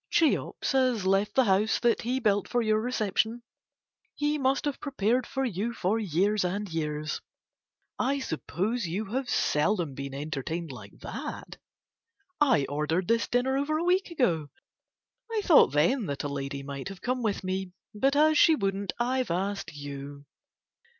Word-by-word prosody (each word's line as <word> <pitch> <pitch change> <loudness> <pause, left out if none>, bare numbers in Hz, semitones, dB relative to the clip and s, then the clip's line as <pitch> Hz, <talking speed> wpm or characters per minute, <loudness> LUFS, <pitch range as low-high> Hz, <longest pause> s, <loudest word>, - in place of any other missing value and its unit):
Cheops 320 -3 +1
has 255 -7 +2
left 195 +2 +2
the 265 - +5
house 205 0 +2
that 235 -1 +3
he 250 +3 -1
built 205 -5 +1
for 245 -1 +1
your 215 0 +2
reception, 230 0 0 0.7
he 295 +1 0
must 270 +1 +1
have 290 -2 -2
prepared 250 -3 0
for 270 0 -1
you 225 +1 -2
for 200 +5 0
years 200 +2 +1
and 200 +3 -2
years. 155 -1 -2 0.8
I 275 +2 +1
suppose 210 - -2
you 190 +7 -2
have 265 0 -1
seldom 160 0 +1
been 140 0 -6
entertained 155 +3 -4
like 125 - -11
that. - - -6 0.8
I 255 - +4
ordered 155 +5 -1
this 230 0 +2
dinner 250 +2 +1
over 305 +2 0
a 325 - -1
week 365 +2 +2
ago. 175 - 0 0.8
I 440 -2 0
thought 315 - +6
then 185 - +2
that 140 -1 -3
a - - -1
lady 140 0 -4
might 140 +3 -6
have 195 -2 -10
come 255 0 -1
with 210 -4 -1
me, 185 0 -3 0.2
but 270 +7 +2
as 310 +1 +5
she 320 - +7
wouldn't 195 -5 -2
I've 255 +1 0
asked 195 +4 -2
you. 140 -1 -8
210 Hz, 160 wpm, -28 LUFS, 165-255 Hz, 0.8 s, she